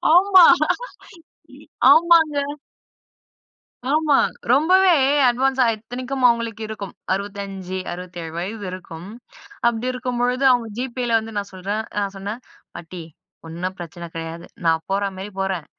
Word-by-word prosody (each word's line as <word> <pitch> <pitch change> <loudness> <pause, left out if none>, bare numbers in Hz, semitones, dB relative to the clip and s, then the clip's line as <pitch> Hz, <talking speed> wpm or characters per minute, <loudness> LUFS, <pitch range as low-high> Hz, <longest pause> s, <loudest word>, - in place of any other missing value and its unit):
ஆமா 370 -1 +7 1.5
ஆமாங்க. 330 -2 +5 1.6
ஆமா. 300 -1 +3 0.3
ரொம்பவே 365 +6 +5 0.4
அட்வான்ஸா 260 +1 +2
இத்தனைக்கும் 250 +4 -6
அவுங்களுக்கு 230 -2 -1
இருக்கும் 205 -3 -7 0.2
65, 195 -1 -5
67 175 -2 -7
வயது 200 +3 -5
இருக்கும். 180 -1 -9 0.6
அப்பிடி 235 +1 -1
இருக்கும்பொழுது, 250 +1 -1
அவுங்க 240 -2 0
GPayல 245 -2 0
வந்து 220 0 -9
நான் 200 -1 -4
சொல்றேன், 200 +4 -3
நான் 200 -1 -2
சொன்னேன் 205 +5 -6 0.3
பாட்டி 170 0 -8 0.4
ஒன்னும் 180 +3 -5
பிரச்சனை 175 0 -8
கிடையாது. 165 +1 -6 0.2
நான் 160 0 +2
போறமாரி 195 0 -2
போறேன். 190 -5 -2
210 Hz, 105 wpm, -21 LUFS, 185-255 Hz, 1.6 s, ஆமா